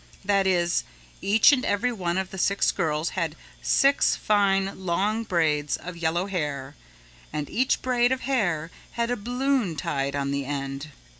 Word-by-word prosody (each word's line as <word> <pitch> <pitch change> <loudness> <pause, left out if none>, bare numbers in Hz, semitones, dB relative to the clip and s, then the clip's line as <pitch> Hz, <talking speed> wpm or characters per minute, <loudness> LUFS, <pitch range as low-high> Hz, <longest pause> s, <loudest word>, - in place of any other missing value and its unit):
That 195 -1 +2
is, 175 -2 +2 0.4
each 215 +7 +5
and 260 -3 +2
every 240 +5 +1
one 180 -6 -2
of 190 -1 -2
the 190 - -6
six 200 +2 +2
girls 155 +1 -1
had 165 -4 -2 0.3
six 275 +1 +3
fine 195 -2 +1
long 200 +6 0
braids 155 -7 +1
of 180 0 -8
yellow 170 +2 0
hair 145 -8 -3 0.6
and 150 -1 -3
each 255 +3 +1
braid 245 -1 +2
of 260 0 0
hair 175 - 0 0.2
had 235 0 -1
a - - +1
balloon 245 - 0
tied 140 -1 -2
on 140 -1 -1
the 140 0 -1
end. 140 +1 -4
185 Hz, 160 wpm, -25 LUFS, 155-220 Hz, 0.6 s, each